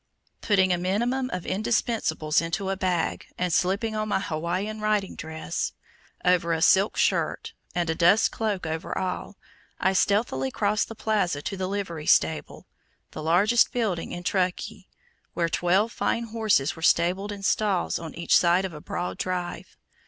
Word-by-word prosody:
Putting 190 -3 +3
a 175 - 0
minimum 240 +8 0
of 180 -1 -3
indispensables 195 -7 0
into 170 +4 -2
a - - -1
bag, 180 -3 -1
and 180 -2 -1
slipping 200 +6 +1
on 215 0 -1
my 205 - +1
Hawaiian 185 +5 -3
riding 210 -2 0
dress 160 - -4 0.5
over 175 -2 +3
a 160 - -1
silk 190 +3 +4
skirt, - - 0 0.2
and 175 -1 0
a 160 - +1
dust 175 +6 +4
cloak 210 -5 -2
over 160 +2 -4
all, 185 +2 -4 0.4
I 190 - +2
stealthily 190 - +1
crossed 205 +8 0
the 225 - -9
plaza 205 -9 0
to 195 - -3
the 185 -1 -3
livery 185 -6 -4
stable, 160 - +1 0.5
the - - -7
largest 195 +9 +3
building 210 -9 -2
in 175 - -6
Truckee, 180 -1 -2 0.5
where 170 -1 +1
twelve 185 +7 +2
fine 235 - -1
horses 220 -10 +1
were 165 - -11
stabled 180 +5 +2
in 200 -1 -7
stalls 200 -2 +1
on 165 -1 -8
each 170 - +2
side 175 +2 +4
of 185 - -5
a 150 - -9
broad 180 +3 -4
drive. 180 0 -4
185 Hz, 160 wpm, -26 LUFS, 170-210 Hz, 0.5 s, silk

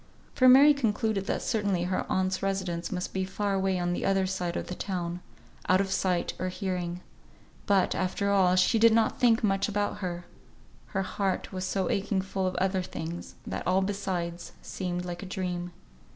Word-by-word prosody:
For 255 -1 +6
Mary 280 +4 +8
concluded 220 -6 0
that - - -1
certainly 205 -6 0
her 185 +1 -1
aunt's 185 0 0
residence 190 -3 -2
must 180 -1 -3
be 190 - 0
far 200 +2 -2
away 190 -1 +1
on 175 0 0
the - - -3
other 195 -1 +2
side 180 -2 -2
of - - -3
the - - -5
town, 175 -2 -3 0.5
out 185 0 +5
of 195 -1 0
sight 180 -3 0
or 185 - -1
hearing. 180 -2 -3 0.7
But, 195 -2 +3
after 200 +2 -1
all, 185 -2 +4
she 185 +5 +3
did 230 0 +6
not 225 -1 +2
think 235 -2 +4
much 195 0 +1
about 205 0 -1
her; 175 -2 -4 0.6
her 195 -1 -2
heart 190 0 -2
was 185 0 -3
so 185 -1 -1
aching 195 -1 0
full 190 -1 -2
of 185 - -3
other 190 0 +1
things, 170 -1 -6
that - - -4
all 185 +1 +3
besides 180 -4 -3
seemed 180 -1 -4
like 175 -1 -5
a 195 - -7
dream. 180 -1 -3
190 Hz, 185 wpm, -28 LUFS, 180-200 Hz, 0.7 s, Mary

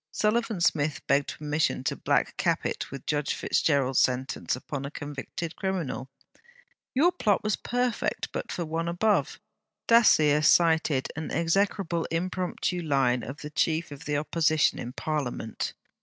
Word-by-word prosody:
Sullivan 215 +2 0
Smith 150 -3 +1
begged 140 0 +1
permission 150 -3 0
to - - -1
'black - - 0
cap' - - 0
it - - -3
with 135 -1 -8
Judge 145 -1 0
FitzGerald's 135 -4 +1
sentence 130 +1 0
upon 135 +2 -6
a 140 - -4
convicted 145 +3 -6
criminal: 175 -9 -3 0.9
'Your 325 +7 +5
plot 210 - +1
was 215 -1 +1
perfect 245 -1 -2
but - - -4
for 175 - -3
One 165 +1 -2
above.' 200 +5 +1 0.5
Dacier 155 -11 +5
cited 160 -4 +3
an 160 0 -4
execrable 170 0 0
impromptu 180 +1 -2
line 135 -6 +2
of 135 +6 -8
the 150 - -7
Chief 160 +1 0
of 145 +2 -9
the 150 -1 0
Opposition 155 +1 +2
in 120 - -5
Parliament. 135 -6 -3
155 Hz, 140 wpm, -27 LUFS, 140-180 Hz, 0.9 s, Your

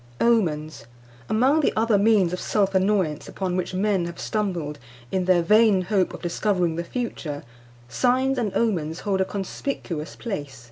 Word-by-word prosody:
OMENS. 160 - +1 0.4
Among 260 +8 +3
the 300 - +2
other 220 -2 +3
means 200 -4 +3
of 180 - -2
self 200 -2 0
annoyance 190 -5 +1
upon 185 -2 -3
which 185 0 -2
men 195 -2 +1
have 170 0 -7
stumbled, 175 -9 -2 0.3
in 185 -1 0
their 180 -2 +4
vain 210 0 +5
hope 190 0 +1
of - - -12
discovering 175 -1 0
the 170 - -2
future, 170 - -4 0.4
signs 255 - +1
and 215 -4 -1
omens 175 -8 0
hold 195 -2 0
a - - +2
conspicuous 190 - -4
place. 145 - -5
190 Hz, 155 wpm, -24 LUFS, 170-215 Hz, 0.4 s, vain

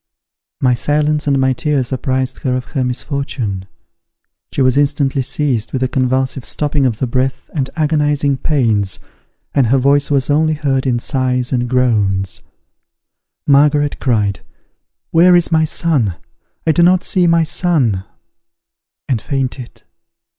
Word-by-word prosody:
My 125 -2 +3
silence 150 +4 0
and 140 -1 +2
my 130 0 +2
tears 140 -4 -1
apprised 130 0 -2
her 125 -2 -1
of 125 - -5
her 135 -4 0
misfortune. 125 -6 -3 0.8
She 135 - 0
was 130 0 +3
instantly 140 -1 +1
seized 130 -4 -1
with 130 -1 -1
a - - +2
convulsive 130 +1 -1
stopping 145 -1 0
of 115 -4 -2
the 130 - -1
breath 130 +1 -2
and 135 -4 -2
agonizing 150 -3 +1
pains, 110 - 0 0.5
and 135 -4 +3
her 130 +4 +3
voice 140 +2 +2
was 140 -3 +1
only 155 +2 +2
heard 135 -3 -1
in 120 -2 +1
sighs 125 0 -1
and 120 -1 -1
groans. 105 -7 0 1.0
Margaret 145 +1 +3
cried, 105 -6 0 0.7
"Where 175 +2 +5
is 175 -1 +2
my 160 -1 +3
son? 145 - 0 0.5
I 160 - +4
do 160 - +2
not 180 +1 +4
see 180 -2 +2
my 165 0 +3
son!" 145 - +1 1.0
and 125 -6 -1
fainted. 130 -1 -4
135 Hz, 140 wpm, -16 LUFS, 125-150 Hz, 1.0 s, Where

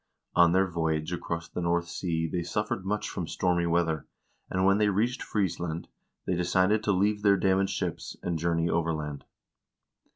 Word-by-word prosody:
On 85 -1 +6
their 95 +2 +4
voyage 80 -2 -1
across 85 -1 -4
the - - -5
North 85 0 +1
Sea 80 -1 -2
they 85 +2 -2
suffered 95 +2 -2
much 105 +1 -1
from 85 - -4
stormy 85 0 +1
weather, 85 -2 0 0.4
and 95 0 +1
when 100 +1 +4
they 105 -1 +4
reached 115 +6 0
Friesland, 85 -5 -2 0.4
they - - 0
decided 95 +4 +2
to 105 - +3
leave 105 +2 +2
their 100 -1 +5
damaged 95 +1 +2
ships, - - -4
and 85 -2 -1
journey 85 0 +1
overland. 80 -4 -2
85 Hz, 165 wpm, -28 LUFS, 85-95 Hz, 0.4 s, On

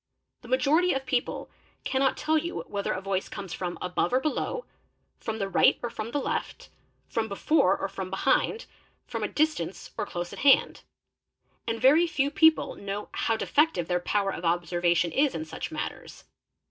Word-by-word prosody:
The 245 - -13
majority 280 +8 +3
of 270 0 -3
people 250 -1 -2 0.3
cannot 265 0 +1
tell 315 +1 +1
you 340 +3 -1
whether 200 0 -3
a 185 - -2
voice 195 -1 -2
comes 195 -4 -7
from 175 -1 -4
above 180 +5 0
or 255 - +3
below, 310 - -2 0.5
from 220 -1 -4
the 195 -3 -2
right 195 - +4
or 240 - -2
from 220 -1 -5
the 290 - -1
left, - - -4 0.4
from 225 -1 -1
before 200 -1 +2
or - - -2
from 190 -1 -6
behind, 270 - +1 0.4
from - - -5
a - - 0
distance 310 +1 -1
or - - -1
close 175 0 -5
at - - -8
hand; 275 -1 +4 0.9
and 230 0 -1
very 305 +8 +5
few 285 -4 0
people 320 0 +4
know 200 +1 -5
how 225 - 0
defective 295 - +1
their 180 -1 +1
power 195 +2 0
of 165 - -7
observation 175 0 +1
is 285 0 +2
in 160 -1 -3
such 155 - -6
matters. - - -6
225 Hz, 175 wpm, -27 LUFS, 185-285 Hz, 0.9 s, very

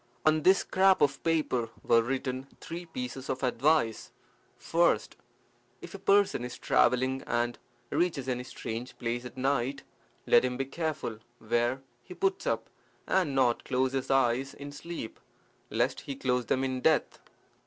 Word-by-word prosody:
On 155 0 +4
this 190 +4 +6
scrap 190 0 +4
of 140 -2 +1
paper 150 -8 +1
were 115 - +5
written 130 +2 -3
three 170 +1 -7
pieces 130 -3 -6
of 130 +1 -2
advice 130 -2 +1 0.5
First, 170 +1 +1 0.6
If - - -10
a 195 - -7
person 195 -8 +3
is 125 0 -6
travelling 130 +2 +2
and 120 0 0 0.3
reaches 160 -7 0
any 125 -1 -1
strange 120 -1 -6
place 120 0 -3
at 125 - -9
night, 135 0 0 0.4
let 120 - +6
him 125 -1 -1
be 135 - -1
careful 150 -6 -3 0.2
where 120 +4 0 0.2
he 150 +9 -11
puts 385 0 0
up, - - -1 0.4
and 175 -8 +1
not 125 -3 +2
close 130 +1 0
his 135 -1 -2
eyes 135 0 +2
in 145 0 -8
sleep, 165 -5 -7 0.5
lest - - 0
he 140 - -6
close 125 -2 0
them 130 - +1
in 130 -1 -2
death. 155 +3 +2
130 Hz, 155 wpm, -29 LUFS, 125-155 Hz, 0.6 s, this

